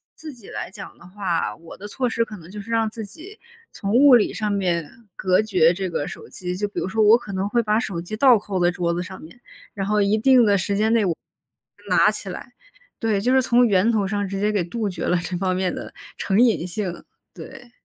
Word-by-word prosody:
自 310 -2 -9
己 235 -5 -15
来 - - -6
讲 - - -11
的 175 - -17
话， 180 -3 -2
我 165 0 -13
的 205 - -8
措 250 +3 -2
施 230 - 0
可 215 -2 -9
能 170 0 -14
就 210 +1 -8
是 230 +3 -10
让 225 -1 +1
自 220 -1 -7
己 340 - -13 0.3
从 200 +1 -4
物 265 +1 +7
理 225 - +2
上 215 -2 -2
面 175 -6 -1 0.3
隔 185 +1 +2
绝 180 -6 +3
这 190 0 -3
个 145 - -3
手 - - -9
机。 180 -1 -5
就 205 +2 -2
比 - - -5
如 - - -2
说 220 +3 +1
我 220 +3 +7
可 210 -5 -9
能 190 +1 -1
会 235 +2 +2
把 215 0 +1
手 190 -7 -4
机 180 +5 -6
倒 250 0 +6
扣 195 -2 -4
在 175 - +3
桌 170 -1 -1
子 175 +1 -2
上 185 0 -10
面， 170 +10 -14 0.3
然 195 -3 -3
后 210 +1 +1
一 205 +2 +2
定 250 0 +5
的 200 -1 +3
时 200 +2 -1
间 215 +2 +1
内 225 -2 +3
我 170 -3 0 0.7
拿 - - +5
起 - - -6
来， - - -8 0.5
对， 220 -3 0
就 250 +4 +1
是 265 - +5
从 245 -1 +3
源 200 +3 +3
头 210 -4 0
上 205 0 -2
直 195 0 -4
接 210 +1 +1
给 205 -4 0
杜 210 +4 -3
绝 170 -3 -6
了 180 - +2
这 175 +1 -4
方 185 0 0
面 185 -1 -1
的 - - -8 0.2
成 195 +3 0
瘾 230 -8 +3
性， 180 -1 -5 0.3
对。 245 -2 -12
205 Hz, 265 characters per minute, -22 LUFS, 185-225 Hz, 0.7 s, 物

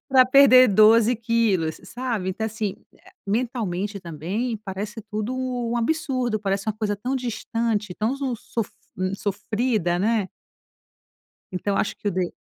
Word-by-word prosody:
pra 260 -2 +6
perder 255 -2 +7
12 220 +3 +5
quilos?", 215 -8 +1
sabe? 225 -4 -3
Então, 220 +4 -3
assim, 215 -2 -3 0.2
eh, - - -20
mentalmente 205 -4 -2
também 185 - -3
parece 205 +2 -6
tudo 215 +4 -2
um 245 -2 -2
absurdo, 255 -4 0
parece 195 0 -1
uma - - +2
coisa 210 -2 -2
tão 255 +6 -2
distante, 225 -4 -2
tão 230 +6 -1
su 270 -3 -2 0.2
sof 225 -3 0 0.3
hum, 185 +1 -1
sofrida, 205 -2 -1
né? 210 -1 +1 1.2
Então 195 +2 -1
acho - - 0
que 205 - -3
o - - +1
de 180 -1 -1
220 Hz, 145 wpm, -24 LUFS, 195-245 Hz, 1.2 s, perder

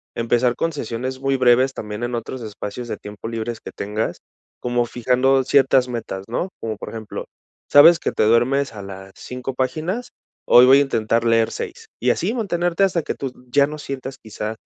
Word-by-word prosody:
empezar 120 +1 +1
con 165 - -1
sesiones 130 -2 -4
muy 135 0 0
breves 130 +1 +4
también 105 0 -6
en 120 0 -2
otros 120 +2 -5
espacios 110 +2 -6
de - - -3
tiempo 105 +1 -9
libres 115 0 -4
que - - -9
tengas, 105 +2 -3 0.4
como 120 -1 0
fijando 125 +3 +2
ciertas 135 -1 +4
metas, 110 -5 -5
¿no? 150 +11 -2
Como 110 -1 -4
por - - -7
ejemplo, 110 -2 -7 0.4
sabes 165 +4 +8
que - - -1
te - - +1
duermes 120 +4 +2
a 105 - -8
las 95 0 -9
5 125 +1 -6
páginas, 160 - -2 0.4
hoy 120 +1 +8
voy 135 +2 +7
a - - +5
intentar 115 -4 0
leer 115 -1 +3
6, 450 -2 -7
y - - +2
así - - -1
mantenerte 175 -5 0
hasta 180 -4 +1
que - - -3
tú 135 -2 -4 0.2
ya 140 +2 +4
no 150 - -7
sientas 135 -2 -6
quizá 110 -1 -6
125 Hz, 190 wpm, -21 LUFS, 115-135 Hz, 0.4 s, sabes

